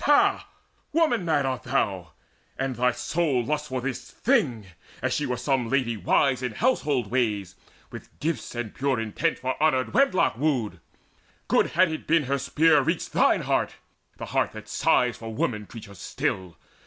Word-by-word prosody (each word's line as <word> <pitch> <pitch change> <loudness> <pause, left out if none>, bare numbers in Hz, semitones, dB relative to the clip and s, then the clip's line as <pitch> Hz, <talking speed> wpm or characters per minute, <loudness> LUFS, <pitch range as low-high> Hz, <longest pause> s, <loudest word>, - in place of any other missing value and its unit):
Ha, 290 0 +4 0.5
woman 300 - +2
mad 150 -4 +2
art 130 -2 -2
thou, 90 -7 -1 0.4
And 135 -1 -2
thy 125 +1 +2
soul 140 -3 0
lusts 150 +2 -2
for 130 -1 -3
this 135 0 -5
thing, 155 - +1 0.3
as - - -1
she 150 - -1
were 125 -1 -2
Some 125 -1 0
lady 125 -3 +1
wise 125 +7 +2
in 125 -3 -3
household 145 - 0
ways, 105 -7 0 0.4
with - - -10
gifts 150 -7 -3
And 120 -3 -4
pure 135 -2 0
intent 115 +9 -1
for 130 +3 -3
honoured 130 -5 +2
wedlock 265 - +3
wooed! 125 - 0 0.7
Good - - +3
had 185 -2 +5
it 155 - -6
been 165 -1 +3
had 130 - -8
her 140 - +2
spear 150 +2 +4
reached - - -2
thine - - +3
heart, - - 0 0.4
The - - -6
heart - - 0
that - - -9
sighs 125 -2 +2
for 115 0 -7
woman 105 -2 -2
creatures 100 -5 -11
still! 90 -4 -3
130 Hz, 170 wpm, -26 LUFS, 115-155 Hz, 0.7 s, had